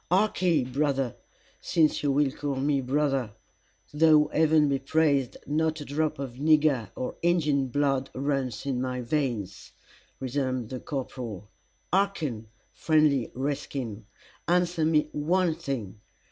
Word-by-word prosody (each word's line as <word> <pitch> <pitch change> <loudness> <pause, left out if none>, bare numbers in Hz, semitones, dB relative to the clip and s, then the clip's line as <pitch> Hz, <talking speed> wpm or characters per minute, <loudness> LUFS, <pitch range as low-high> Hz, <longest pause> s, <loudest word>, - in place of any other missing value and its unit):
"Harkee, 180 -5 +2
brother, 135 -1 -1 0.4
since 155 -2 +2
you 145 - +1
will 140 0 +2
call 145 0 -3
me 140 +1 +1
brother; 135 -4 0 0.6
though, 155 0 +5
Heaven 155 -1 +4
be 140 -1 +1
praised, 140 -2 +1
not 155 +1 0
a 145 - -7
drop 155 +2 -1
of 130 -3 -6
nigger 150 -5 +3
or 130 - -4
Injin 150 -6 +2
blood 135 0 0
runs 135 -3 -2
in 130 -3 -1
my 125 -1 -2
veins," 115 - -3 0.5
resumed 130 -3 -2
the 130 - -4
corporal. 120 - -6 0.4
"Harken, 160 - 0 0.3
friend 155 -5 +2
redskin, 130 -5 -4 0.4
answer 175 -1 +2
me 155 -1 +3
one 170 +3 +1
thing. 115 -9 -5
140 Hz, 125 wpm, -27 LUFS, 130-155 Hz, 0.6 s, though